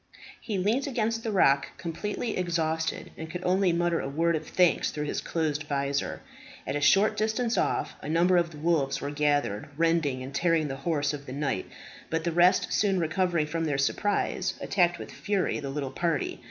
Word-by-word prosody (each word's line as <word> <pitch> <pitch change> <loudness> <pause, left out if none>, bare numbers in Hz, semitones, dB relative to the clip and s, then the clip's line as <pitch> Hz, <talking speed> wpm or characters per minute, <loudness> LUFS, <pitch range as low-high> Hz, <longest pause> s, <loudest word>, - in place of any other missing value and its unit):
He 210 -4 -3
leant 220 +9 +1
against 230 -3 -1
the 225 - -3
rock 140 -8 +3
completely 210 +6 -3
exhausted, 160 -3 -1
and 160 0 -7
could 180 +2 -6
only 185 0 +3
mutter 170 0 +1
a - - -3
word 165 +4 +1
of 155 0 -4
thanks 180 -2 +3
through 150 - -4
his 150 - -2
closed 155 -2 -2
visor. 140 -1 -2 0.4
At - - -2
a 145 - -1
short 205 +7 +4
distance 220 +2 0
off - - 0
a - - -6
number 175 +3 +3
of 170 -1 +2
the 155 - -12
wolves 150 -3 +1
were 140 - -4
gathered, 145 -7 0
rending 165 -6 +1
and 135 +2 -8
tearing 165 -1 +1
the 135 - -4
horse 145 0 0
of 145 -1 -7
the 130 - -6
knight; 140 -9 -2 0.4
but 165 0 -1
the 170 - 0
rest 175 +2 +3
soon 195 -3 +2
recovering 170 0 +1
from 165 +2 -2
their 145 -3 0
surprise, 190 +6 0
attacked 175 -3 +2
with - - -8
fury 200 -2 -1
the 140 -2 -5
little 135 -1 -3
party. 165 -4 -1
165 Hz, 195 wpm, -28 LUFS, 145-185 Hz, 0.4 s, short